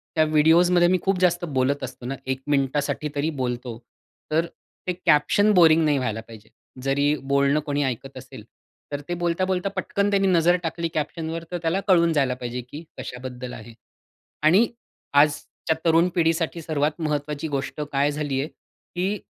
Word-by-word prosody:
त्या 155 Hz, -, +4 dB
व्हिडिओजमध्ये 170 Hz, +3 st, +4 dB
मी 185 Hz, -, +3 dB
खूप 195 Hz, -1 st, 0 dB
जास्त 175 Hz, -1 st, +2 dB
बोलत 130 Hz, +2 st, +1 dB
असतो 130 Hz, -1 st, -7 dB
ना 135 Hz, +2 st, -3 dB
एक 130 Hz, 0 st, -2 dB
मिनिटासाठी 145 Hz, +2 st, 0 dB
तरी 145 Hz, +3 st, 0 dB
बोलतो. 120 Hz, -2 st, -3 dB, 0.5 s
तर 165 Hz, +2 st, +2 dB, 0.4 s
ते 180 Hz, -, +1 dB
कॅप्शन 180 Hz, +6 st, +4 dB
बोरिंग 165 Hz, -3 st, +6 dB
नाही 150 Hz, -2 st, +2 dB
व्हायला 110 Hz, -4 st, -2 dB
पाहिजे. 110 Hz, -2 st, -13 dB, 0.3 s
जरी 140 Hz, +2 st, +2 dB, 0.2 s
बोलणं 140 Hz, +2 st, +3 dB
कोणी 145 Hz, 0 st, 0 dB
ऐकत 130 Hz, +1 st, -4 dB
असेल, 130 Hz, -3 st, -10 dB, 0.5 s
तर 145 Hz, 0 st, -3 dB
ते -, -, 0 dB
बोलता-बोलता 185 Hz, +2 st, 0 dB
पटकन 200 Hz, 0 st, 0 dB
त्यांनी 195 Hz, -1 st, +2 dB
नजर 175 Hz, -1 st, +4 dB
टाकली 165 Hz, 0 st, -2 dB
कॅप्शनवर 160 Hz, +2 st, -3 dB
तर 175 Hz, -, -2 dB
त्याला 165 Hz, +3 st, 0 dB
कळून 170 Hz, -3 st, +4 dB
जायला 135 Hz, -4 st, +2 dB
पाहिजे, 125 Hz, 0 st, -5 dB
की 140 Hz, +6 st, -10 dB
कशाबद्दल 125 Hz, 0 st, -7 dB
आहे. 115 Hz, +1 st, -10 dB, 0.7 s
आणि 190 Hz, +9 st, +5 dB, 0.5 s
आजच्या 150 Hz, +2 st, -1 dB
तरुण 165 Hz, +2 st, +4 dB
पिढीसाठी 165 Hz, 0 st, +1 dB
सर्वात 155 Hz, 0 st, -1 dB
महत्त्वाची 150 Hz, 0 st, -2 dB
गोष्ट 145 Hz, +1 st, -3 dB
काय 140 Hz, +1 st, +2 dB
झाली 145 Hz, -2 st, -2 dB
आहे, 145 Hz, -, -3 dB
की 190 Hz, +4 st, -5 dB
150 Hz, 160 wpm, -24 LUFS, 135-170 Hz, 0.7 s, बोरिंग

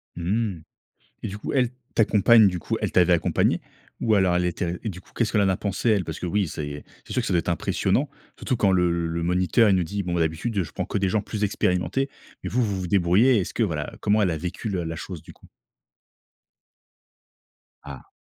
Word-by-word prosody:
Mmh 95 Hz, 0 st, -1 dB, 0.6 s
et -, -, -2 dB
du 100 Hz, +1 st, -6 dB
coup, -, -, -5 dB
elle 125 Hz, -3 st, +2 dB, 0.2 s
ta 115 Hz, -, +4 dB
compagne 110 Hz, +1 st, +5 dB
du 90 Hz, -, -1 dB
coup, 85 Hz, -, -3 dB
elle -, -, -1 dB
t'avait 90 Hz, -1 st, +4 dB
accompagné? 85 Hz, -, +1 dB, 0.4 s
Ou 110 Hz, -2 st, +2 dB
alors 95 Hz, -3 st, +3 dB
elle 90 Hz, -, +1 dB
était 90 Hz, 0 st, -2 dB
et 110 Hz, -, -2 dB
du 95 Hz, -1 st, -8 dB
coup, -, -, -24 dB
qu'est-ce 115 Hz, -2 st, 0 dB
qu'elle 105 Hz, -, +2 dB
en 95 Hz, -, +3 dB
a 95 Hz, -, +1 dB
pensé 100 Hz, +3 st, -1 dB
elle, 105 Hz, -4 st, +3 dB
parce 80 Hz, -2 st, -6 dB
que -, -, -4 dB
oui, 100 Hz, +1 st, 0 dB
c'est 75 Hz, -1 st, -6 dB, 0.2 s
c'est -, -, -7 dB
sûr -, -, +1 dB
que -, -, -4 dB
ça -, -, 0 dB
doit 90 Hz, -, +3 dB
être 85 Hz, -, -3 dB
impressionnant, 135 Hz, -, 0 dB, 0.3 s
surtout 130 Hz, -, -1 dB
quand 100 Hz, -3 st, +3 dB
le 85 Hz, -2 st, +1 dB
le 85 Hz, +1 st, -3 dB
moniteur, 90 Hz, +6 st, +3 dB
il 95 Hz, -, +4 dB
nous 90 Hz, -, +2 dB
dit: 100 Hz, +4 st, -3 dB
«Bon 90 Hz, -1 st, -3 dB
bah, 85 Hz, -, +1 dB
d'habitude, 90 Hz, +6 st, -1 dB
je -, -, -10 dB
prends -, -, -3 dB
que -, -, -3 dB
des 95 Hz, -1 st, +1 dB
gens 110 Hz, +1 st, +1 dB
plus 105 Hz, +1 st, -4 dB
expérimentés» 105 Hz, +7 st, 0 dB, 0.3 s
mais -, -, -3 dB
vous, 125 Hz, +2 st, +1 dB
vous 100 Hz, -4 st, -2 dB
vous 90 Hz, -, -4 dB
débrouillez, 100 Hz, +7 st, +4 dB
est-ce 90 Hz, -, -4 dB
que -, -, -2 dB
voilà, 80 Hz, -9 st, -1 dB
comment 105 Hz, +1 st, +2 dB
elle 90 Hz, -, +1 dB
a 80 Hz, -, -2 dB
vécu 90 Hz, +6 st, -5 dB
le 95 Hz, -4 st, -2 dB
la 80 Hz, 0 st, -4 dB
chose, 90 Hz, -1 st, -7 dB
du -, -, -13 dB
coup? -, -, -21 dB, 2.4 s
Ah. 70 Hz, -3 st, -11 dB
95 Hz, 235 wpm, -24 LUFS, 85-105 Hz, 2.4 s, compagne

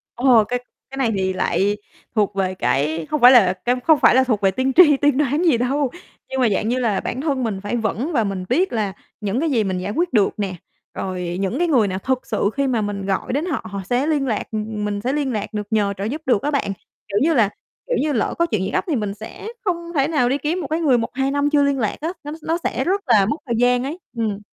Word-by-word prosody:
Ồ, 240 Hz, -3 st, +5 dB
cái 245 Hz, +4 st, -2 dB, 0.3 s
cái 270 Hz, -, -8 dB
này 240 Hz, -4 st, +1 dB
thì 190 Hz, 0 st, 0 dB
lại 195 Hz, +3 st, 0 dB, 0.4 s
thuộc 205 Hz, -2 st, +1 dB
về 185 Hz, -1 st, -1 dB
cái 155 Hz, 0 st, 0 dB
hông 300 Hz, -, 0 dB
phải 250 Hz, +1 st, +9 dB
là 195 Hz, -8 st, +6 dB
cái 245 Hz, +1 st, +3 dB
không 315 Hz, -2 st, +5 dB
phải -, -, +5 dB
là 260 Hz, -, +5 dB
thuộc 220 Hz, -5 st, 0 dB
về 195 Hz, -1 st, +3 dB
tiên 260 Hz, +6 st, 0 dB
tri, 300 Hz, -6 st, +7 dB
tiên 290 Hz, -2 st, +2 dB
đoán 295 Hz, +3 st, +1 dB
gì 270 Hz, -8 st, +4 dB
đâu, 265 Hz, +2 st, 0 dB, 0.4 s
nhưng 265 Hz, 0 st, -1 dB
mà, 235 Hz, -, +4 dB
dạng 210 Hz, +3 st, 0 dB
như 255 Hz, +1 st, 0 dB
là, 220 Hz, -5 st, +1 dB
bản 255 Hz, -, -4 dB
thân 275 Hz, -5 st, -1 dB
mình 200 Hz, -4 st, -2 dB
phải 205 Hz, +4 st, -3 dB
vững 230 Hz, -, -2 dB
và 230 Hz, -5 st, +2 dB
mình 195 Hz, -2 st, -3 dB
biết 370 Hz, -1 st, +1 dB
là 205 Hz, -4 st, -1 dB, 0.3 s
những 210 Hz, +5 st, -1 dB
cái 320 Hz, -1 st, 0 dB
gì 225 Hz, -4 st, +2 dB
mình 190 Hz, -2 st, -2 dB
giải 185 Hz, +3 st, -3 dB
quyết 340 Hz, +4 st, -1 dB
được 205 Hz, -3 st, +4 dB
nè, 195 Hz, -3 st, -2 dB, 0.4 s
rồi 180 Hz, -2 st, -4 dB
những 195 Hz, -, -1 dB
cái 350 Hz, -, +2 dB
người 245 Hz, -10 st, +3 dB
nào 190 Hz, 0 st, -3 dB
thực 260 Hz, +3 st, -2 dB
sự 210 Hz, -2 st, 0 dB
khi 280 Hz, -1 st, +1 dB
mà 235 Hz, -4 st, +1 dB
mình 200 Hz, -2 st, -3 dB
gọi 195 Hz, +5 st, -2 dB
đến 300 Hz, +5 st, 0 dB
họ 300 Hz, -10 st, -3 dB
họ 200 Hz, -1 st, -4 dB
sẽ 250 Hz, +5 st, +1 dB
liên 290 Hz, -4 st, +1 dB
lạc, 215 Hz, -3 st, -1 dB
ừm, 215 Hz, -1 st, -3 dB
mình 205 Hz, -1 st, -2 dB
sẽ 260 Hz, +4 st, -1 dB
liên 285 Hz, -3 st, -1 dB
lạc 215 Hz, +1 st, -4 dB
được, 210 Hz, -1 st, -3 dB
nhờ 205 Hz, -2 st, +1 dB
trợ 195 Hz, -, -4 dB
giúp 285 Hz, +9 st, -3 dB
được 245 Hz, -4 st, +2 dB
á 295 Hz, +2 st, -1 dB
bạn, 275 Hz, -8 st, 0 dB, 0.4 s
kiểu 200 Hz, 0 st, -1 dB
như 325 Hz, +2 st, +3 dB
là, 220 Hz, -7 st, +3 dB, 0.4 s
kiểu -, -, 0 dB
như, 300 Hz, 0 st, 0 dB
lỡ 230 Hz, -, 0 dB
có 340 Hz, -, +4 dB
chuyện 215 Hz, -, -1 dB
gì 190 Hz, -, -2 dB
gấp -, -, 0 dB
thì 310 Hz, -, 0 dB
mình 210 Hz, -3 st, -2 dB
sẽ 220 Hz, -, -9 dB, 0.2 s
không 340 Hz, -2 st, -2 dB
thể 275 Hz, 0 st, +3 dB
nào 290 Hz, -7 st, +1 dB
đi 275 Hz, -, +1 dB
kiếm 330 Hz, +5 st, -2 dB
một 285 Hz, -, -4 dB
cái 320 Hz, +2 st, -1 dB
người 265 Hz, -6 st, +4 dB
1-2 265 Hz, +4 st, -1 dB
năm 285 Hz, +1 st, +1 dB
chưa 290 Hz, -1 st, +3 dB
liên 280 Hz, -1 st, +1 dB
lạc 215 Hz, -, -1 dB
á, 325 Hz, -, -1 dB
nó 295 Hz, -, -6 dB
s -, -, -23 dB
nó 330 Hz, +1 st, 0 dB
sẽ -, -, -1 dB
rất 390 Hz, +3 st, 0 dB
là 205 Hz, -5 st, +5 dB
mất 290 Hz, +9 st, -1 dB
thời 235 Hz, -2 st, -1 dB
gian 245 Hz, +1 st, +3 dB
ấy, 305 Hz, +7 st, -5 dB, 0.2 s
ừm. 215 Hz, -3 st, -1 dB
245 Hz, 275 wpm, -21 LUFS, 205-285 Hz, 0.4 s, phải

